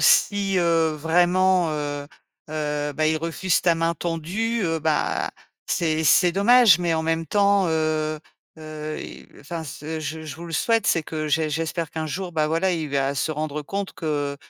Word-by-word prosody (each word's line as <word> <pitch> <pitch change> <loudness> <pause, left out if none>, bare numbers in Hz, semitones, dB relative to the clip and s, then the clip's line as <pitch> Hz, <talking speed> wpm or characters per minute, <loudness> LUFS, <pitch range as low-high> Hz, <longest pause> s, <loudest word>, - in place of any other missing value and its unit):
si, 200 -2 +3
heu, 165 -2 +2
vraiment, 175 +2 +2
heu 145 -1 -4 0.4
heu, 150 -1 -2
bah, 155 +2 0
il 155 - +2
refuse 165 +2 0
ta 170 -2 +4
main 165 +1 0
tendue, 185 +8 -2
heu, 165 -1 0
bah, 155 -1 0 0.4
c'est 160 -1 0
c'est 175 +5 +5
dommage, 210 -1 +6
mais 175 -1 0
en 160 - 0
même 165 0 -1
temps, 200 -1 +3
heu 155 -1 0 0.4
heu 155 0 -6
et - - -10
enfin 165 +3 -6
ce 155 +2 -6
je 160 +1 -5
je 155 -2 -7
vous 170 - -9
le 165 - -8
souhaite, 225 +7 +1
c'est 165 - +2
que 155 0 -4
j'é 155 +1 +1
j'espère 160 +1 -2
qu'un 160 -1 -4
jour, 180 +3 -4
bah, 155 -1 +1
voilà, 165 +4 +1
il 160 -3 -2
va 140 0 0
se 145 - -1
rendre 150 0 -3
compte 195 +5 -4
que, 145 -3 -2
160 Hz, 180 wpm, -23 LUFS, 155-175 Hz, 0.4 s, dommage